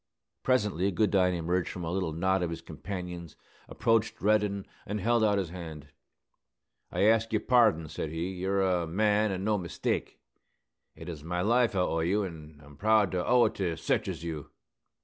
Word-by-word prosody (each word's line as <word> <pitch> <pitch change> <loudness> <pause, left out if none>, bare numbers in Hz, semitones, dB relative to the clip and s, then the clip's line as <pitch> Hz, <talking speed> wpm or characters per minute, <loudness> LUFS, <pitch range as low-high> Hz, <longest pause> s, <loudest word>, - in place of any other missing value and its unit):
Presently 105 -7 +1
Goodine 95 -1 +2
emerged 85 +1 -1
from 90 - -6
a 80 - -3
little 90 -3 -1
knot 95 +4 +1
of 90 - -1
his 85 0 -6
companions, 90 0 -7 0.3
approached 115 -1 +1
Reddin, 105 -1 +1 0.2
and 105 +1 -4
held 115 +3 +2
out 105 -2 +3
his 95 -4 -2
hand. 80 -5 -8 1.0
"I - - 0
ask 115 +1 +3
yer 110 - +2
pardon," 110 -11 +3
said 75 - -4
he. 80 +3 -3
"You're 95 +1 0
a 90 -3 +1
man, 105 +4 +2
an' 95 0 -3
no 105 0 +1
mistake. 85 -3 -3 0.8
It - - -10
is 80 -4 -7
my 90 +2 -2
life 115 +2 +2
I 95 - +2
owe 80 -2 0
to 80 - 0
you; 100 +3 +1
an' 80 -4 -10
I'm 75 0 -15
proud 110 0 +3
to 90 -1 -1
owe 125 +3 +4
it - - 0
to 85 -3 -1
sech - - 0
as - - -5
you!" 80 -3 -5
95 Hz, 190 wpm, -29 LUFS, 85-105 Hz, 1.0 s, owe